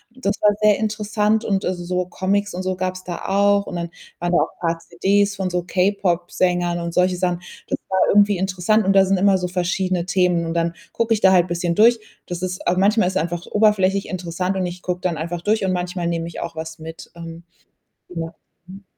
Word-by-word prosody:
Das 205 -5 -1
war 210 - +5
sehr 210 -1 +5
interessant 215 0 0
und, 195 -2 0
also, 180 -1 -2
so 180 +1 -1
Comics 200 +3 -1
und 185 +1 -4
so 185 0 -1
gab's 185 0 -3
da 175 -1 -6
auch. 200 +1 +3
Und - - -6
dann 170 -1 -3 0.3
waren 175 0 -1
da 175 - +4
auch - - -2
paar 165 -1 0
CDs 200 +4 +1
von 190 -2 -2
so 180 -1 -1
K-Pop-Sängern 180 -2 0
und 170 0 -4
solche 180 0 +2
Sachen. 180 -1 0 0.3
Das - - -2
war 190 0 +1
irgendwie 205 -1 +4
interessant 190 +3 +1
und 195 - +3
da 195 0 +6
sind 195 0 +2
immer 195 0 +3
so 180 - -2
verschiedene 180 0 -1
Themen. 180 -2 +1
Und 165 - -3
dann 170 0 0 0.2
gucke 230 -1 +1
ich 210 - -5
da 190 - +6
halt 180 -1 +4
bisschen 175 0 -1
durch. 230 +4 +5 0.3
Das 175 0 -5
ist, 185 0 -3
äh 175 - +3
manchmal 205 0 +3
ist 190 0 -1
einfach 175 0 -3
oberflächlich 200 -2 +2
interessant 180 +1 -3
und 185 -1 -1
ich 175 +1 -8
gucke 180 0 -3
dann 170 -4 -1
einfach 170 +2 -4
durch 210 +1 +1
und 185 - +1
manchmal 180 0 -3
nehme 165 -1 -2
ich 170 - -7
auch 165 - -5
was 160 0 -6
mit. 160 +1 -10
Ähm. 165 0 -9 0.7
Ja. 165 -1 -6 0.3
Mhm. 195 +2 -12
185 Hz, 220 wpm, -21 LUFS, 175-200 Hz, 0.7 s, da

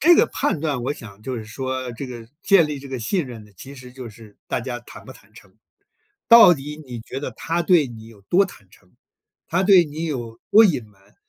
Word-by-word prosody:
这 345 +3 +7
个 - - +5
判 280 - -1
断， 145 -6 -2
我 135 - -1
想 105 -7 -13
就 130 +2 -4
是 110 - -6
说， 130 +3 -5
这 125 +4 -7
个 120 -3 -10
建 195 -6 +5
立 150 -1 -5
这 140 - -11
个 130 -2 -4
信 155 - -1
任 115 -4 -10
呢， 105 - -20
其 135 +9 -11
实 125 -2 -12
就 125 -2 -9
是 105 -1 -16
大 - - -1
家 120 0 -5
坦 - - -14
不 - - -11
坦 - - -21
诚。 - - -18 0.7
到 230 -7 +9
底 150 +1 -8
你 120 -3 -8
觉 130 +4 -7
得 145 - -4
他 165 +8 -2
对 170 -4 +4
你 115 -3 -11
有 115 -3 -16
多 180 - +3
坦 105 - -13
诚， 90 - -24 0.5
他 180 +3 0
对 190 -2 +6
你 155 +2 -6
有 120 -6 -5
多 220 +2 +8
隐 150 - +1
瞒， 100 -2 -27
130 Hz, 250 characters per minute, -22 LUFS, 115-160 Hz, 0.7 s, 到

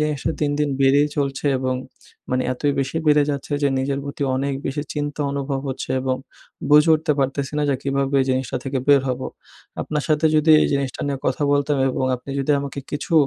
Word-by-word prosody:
জিনিসটা 150 0 -1
দিন, 150 -1 +1
দিন 150 -1 +1
বেড়েই 140 +2 +4
চলছে 140 0 -1
এবং 130 0 -1 0.6
মানে 130 0 +1
এতই 145 +3 0
বেশি 135 +3 -3
বেড়ে 150 -1 +5
যাচ্ছে 140 +1 -4
যে 140 - +4
নিজের 135 +1 -1
প্রতি 140 0 -5
অনেক 140 +1 -1
বেশি 145 +2 -2
চিন্তা 145 0 -3
অনুভব 140 -1 -2
হচ্ছে। 130 - -5
এবং 130 0 0 0.5
বুঝে 150 +2 +6
উঠতে 155 0 +1
পারতেছি 135 +1 -1
না - - +1
যে - - +2
কীভাবে 140 0 +1
জিনিসটা 130 -1 -1
থেকে 135 0 -1
বের 140 -1 +7
হব? 125 0 -2 0.6
আপনার 150 -1 -2
সাথে 155 +1 +3
যদি 155 +1 +4
এই - - +3
জিনিসটা 140 -2 -2
নিয়ে 140 -1 -2
কথা 130 +3 0
বলতাম 145 0 +1
এবং 130 - -1
আপনি 125 +3 -10
যদি 135 - -1
আমাকে 140 0 -6
কিছু 145 +3 -4
140 Hz, 195 wpm, -22 LUFS, 135-150 Hz, 0.6 s, বের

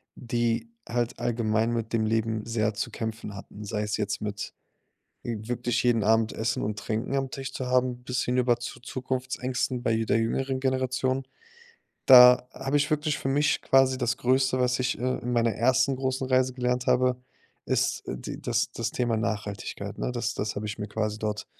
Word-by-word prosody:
die 115 -1 -1 0.2
halt 120 0 -1
allgemein 115 -1 +1
mit 115 -1 -3
dem 110 -1 +2
Leben 110 0 0
sehr 110 -2 0
zu 105 - -3
kämpfen 110 -2 -5
hatten, 105 +2 -10
sei 105 0 -2
es 105 0 -1
jetzt 100 -2 -2
mit 105 -1 -4 0.7
w 110 -1 -5
wirklich 120 0 0
jeden 115 -3 +3
Abend 110 0 +3
Essen 110 0 -1
und 105 0 -2
Trinken 110 +4 -3
am 135 -1 -1
Tisch 135 0 -6
zu 130 - -4
haben 125 -1 +1
bis 125 0 -1
hinüber 125 -1 +2
zu 120 +1 -7
Zukunftsängsten 125 0 -3
bei 115 -2 +1
der - - +2
jüngeren 130 +3 -1
Generation. 130 0 0 0.8
Da 125 -1 +9
habe 135 +2 -1
ich 145 +2 0
wirklich 150 0 0
für - - -3
mich 145 +2 +2
quasi 135 -1 +4
das 125 0 0
Größte, 130 +1 +2
was 125 0 +2
ich, 125 0 0
äh, 130 +1 -1
in 125 +1 -3
meiner 115 -1 +2
ersten 130 +3 +2
großen 130 0 -1
Reise 130 -1 +2
gelernt 125 0 -1
habe, 125 0 +2 0.4
ist - - +1
die - - -6
das - - 0
das - - -2
Thema 120 -2 0
Nachhaltigkeit, 105 -2 -4
ne? - - -1
Das - - -2
das 105 -1 -3
habe 105 +1 -3
ich 105 - -5
mir 105 - -4
quasi 110 0 -2
dort 105 -1 -3
120 Hz, 185 wpm, -27 LUFS, 110-130 Hz, 0.8 s, Da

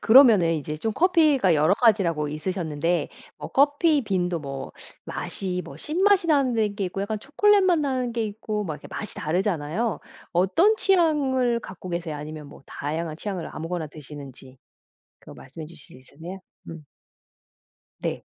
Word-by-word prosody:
그러면은 220 -9 +7
이제 150 0 -4
좀 220 +7 -2
커피가 305 - +4
여러 155 +6 +4
가지라고 180 -11 +2
있으셨는데 165 +1 -2 0.3
어 - - -6
커피빈도 270 - +2
뭐 135 -1 -6 0.3
맛이 180 -2 -4
뭐 135 - -10
신맛이 365 - +2
나는데 245 -9 +2
게 200 -2 -2
있고 185 +2 -5
약간 215 +1 -3
초콜릿 405 - +3
맛 360 -3 +3
나는 260 -4 -1
게 230 -1 -1
있고 210 0 -4
막 155 -4 -3
이렇게 145 - -12
맛이 215 - -6
다르잖아요. 180 +4 -1 0.3
어떤 325 - +3
취향을 275 - +2
갖고 185 -2 -9
계세요? 170 -3 -3
아니면 150 0 -8
뭐 - - -14
다양한 155 +2 -4
취향을 190 -3 -5
아무거나 165 0 -4
드시는지 140 -3 -11 0.6
그거 - - -13
말씀해 155 +4 -10
주실 160 -5 -14
수 130 - -20
있으세요? 175 +6 -8 0.3
음. 165 -2 -9 1.2
네. - - -3
190 Hz, 335 characters per minute, -25 LUFS, 155-255 Hz, 1.2 s, 그러면은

